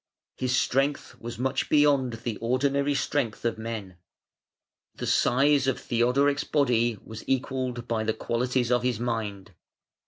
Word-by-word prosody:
His 130 0 0
strength 135 +3 0
was 120 0 -7
much 130 +2 -1
beyond 145 -4 +3
the 115 -4 -3
ordinary 140 +4 +1
strength 135 -5 -1
of 115 -1 -1
men. 110 -5 -6 1.0
The - - -5
size 135 +2 +3
of 135 - 0
Theodoric's 130 +4 +2
body 120 -6 +1
was 110 -1 -8
equalled 130 -2 -1
by 115 -1 0
the 110 0 0
qualities 125 +2 -1
of 120 -1 +3
his 125 -3 -1
mind. 105 -5 -3
125 Hz, 135 wpm, -27 LUFS, 115-135 Hz, 1.0 s, beyond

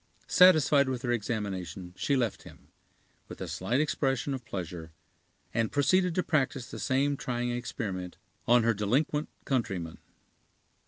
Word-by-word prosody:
Satisfied 155 -6 +5
with 125 -2 -3
her 120 - 0
examination, 95 -6 -3
she 140 - 0
left 120 -5 -1
him, - - -15 0.6
with - - -10
a - - -4
slight 125 +3 -1
expression 135 -2 0
of 130 -2 -5
pleasure, 85 -3 -6 0.6
and 115 -1 0
proceeded 175 +5 +2
to 180 - +1
practise 135 -5 -1
the - - -6
same 140 +2 +1
trying 120 -2 -2
experiment 100 -7 -4 0.3
on 120 0 +5
her 115 0 +3
delinquent 135 +9 0 0.2
countryman. 100 - -2
120 Hz, 140 wpm, -29 LUFS, 100-140 Hz, 0.6 s, Satisfied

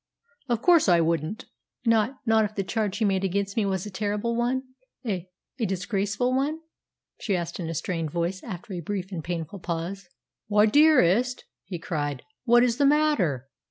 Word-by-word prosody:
"Of 235 -2 0
course 340 - +5
I 175 -1 +6
wouldn't." 165 +4 -1 0.4
"Not 230 +3 +2
not 225 -1 +4
if 210 0 -3
the 195 - -1
charge 205 0 -1
he 220 - +1
made 195 -1 +1
against 200 +1 -1
me 215 -3 +1
was 190 -1 -1
a 210 - -7
terrible 210 +4 -1
one 245 +2 0 0.4
a 185 -5 -3 0.3
a 230 - +1
disgraceful 200 +5 -1
one?" 285 +4 0 0.6
she 200 - 0
asked 170 +1 -4
in 165 -2 -3
a 165 - -3
strained 165 -1 -2
voice 170 +4 -2
after 195 -2 -7
a 180 - -3
brief 190 +2 -4
and 165 -4 -4
painful 175 +3 -4
pause. 175 +2 -4 0.4
"Why, 210 0 +5
dearest!" 250 - +4 0.2
he 185 -1 -5
cried, 145 -5 -3 0.2
"what 240 0 +6
is 240 -1 +1
the 285 - +3
matter? 245 - +2
200 Hz, 180 wpm, -26 LUFS, 175-230 Hz, 0.6 s, I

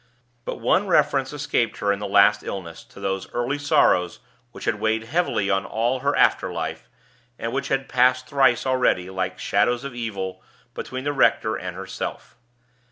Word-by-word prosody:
But - - -3
one 195 +2 +1
reference 140 -6 +2
escaped 140 -6 -1
her 100 - +1
in 100 - -5
her 105 - -4
last 100 +1 +5
illness 85 -4 -7
to - - -15
those 95 -1 -3
early 125 +4 -1
sorrows 90 -10 +2 0.3
which - - -9
had 105 - 0
weighed 110 +1 0
heavily 115 - 0
on 95 0 +1
all 120 +4 -1
her - - 0
after - - +3
life, - - -5 0.5
and 115 0 -4
which 140 - -2
had 135 0 -1
passed 130 0 +3
thrice 130 -3 +2
already, 125 -8 +1
like 95 0 -3
shadows 120 +5 +1
of 140 -2 -6
evil, 95 -6 -5 0.3
between 130 0 -6
the 145 +1 -1
rector 135 - +2
and - - -6
herself. - - -6
120 Hz, 170 wpm, -23 LUFS, 100-135 Hz, 0.5 s, last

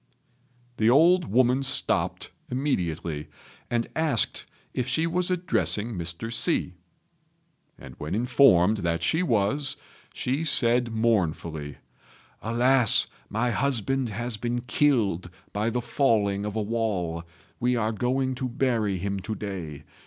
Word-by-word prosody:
The 110 +1 +3
old 170 +7 +5
woman 130 0 +2
stopped 135 - 0 0.2
immediately, 85 - -2 0.4
and 120 -1 0
asked 155 -8 0 0.3
if 125 - -2
she 160 +5 +1
was 175 +2 0
addressing 170 - 0
Mr. 85 +4 -5
Hsi; 100 -5 +1 1.0
and 65 - -11
when 75 +5 -3
informed 110 -5 +4
that 85 -3 -2
she 160 - +2
was, 135 - +1 0.3
she 135 +5 -2
said 120 -5 +2
mournfully, 85 -10 -1 0.6
"Alas! 120 +1 +4 0.2
my 115 +3 0
husband 135 +1 0
has 115 +2 -3
been 120 +2 -2
killed 115 - +1 0.2
by 105 +3 0
the 120 +1 -2
falling 110 -5 +1
of 105 0 -4
a 110 - 0
wall. 100 -7 -2 0.4
We 125 +1 +1
are 110 -2 0
going 130 +4 -1
to 130 - -1
bury 115 -6 0
him 100 +2 -3
to 110 +3 -5
day. 90 -8 -6
115 Hz, 125 wpm, -26 LUFS, 100-130 Hz, 1.0 s, old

